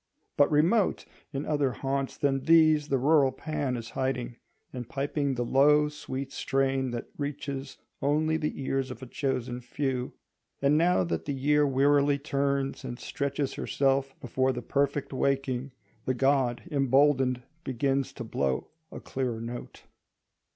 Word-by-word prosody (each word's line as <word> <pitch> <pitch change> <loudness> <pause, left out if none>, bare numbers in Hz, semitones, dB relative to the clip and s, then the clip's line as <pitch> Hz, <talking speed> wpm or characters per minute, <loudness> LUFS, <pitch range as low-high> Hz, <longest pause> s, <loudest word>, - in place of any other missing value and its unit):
But 145 - +5
remote 170 +8 +2 0.3
in 140 0 -3
other 145 -4 +1
haunts 135 +1 -2
than 135 -2 0
these 155 -2 +5
the 135 - +1
rural 140 0 +4
Pan 145 -5 -3
is 115 -1 -7
hiding, 125 -2 -2 0.4
and 125 -2 -6
piping 140 0 -1
the 120 0 -1
low, 150 +4 +4
sweet 135 -2 -6
strain 135 -1 0
that 120 -1 -5
reaches 140 -1 -4 0.2
only 155 +3 +2
the 150 -2 -2
ears 135 0 -1
of 130 +1 -8
a - - -5
chosen 125 -2 -2
few. 125 0 -2 0.5
And 140 +2 +3
now 165 - +3
that 85 -2 -3
the 145 - -2
year 145 +2 +3
wearily 140 +1 +3
turns 140 -1 -1
and 120 -2 -5
stretches 140 0 -2
herself 135 -1 0
before 130 +2 0
the 125 -1 -5
perfect 140 +1 0
waking, 135 -1 0 0.3
the 130 - 0
god 135 -2 +2
emboldened 135 -2 +3 0.2
begins 135 +1 0
to 120 - -6
blow 70 - -2 0.2
a - - -7
clearer 125 -4 -3
note. 120 +1 -7
135 Hz, 145 wpm, -28 LUFS, 130-145 Hz, 0.5 s, But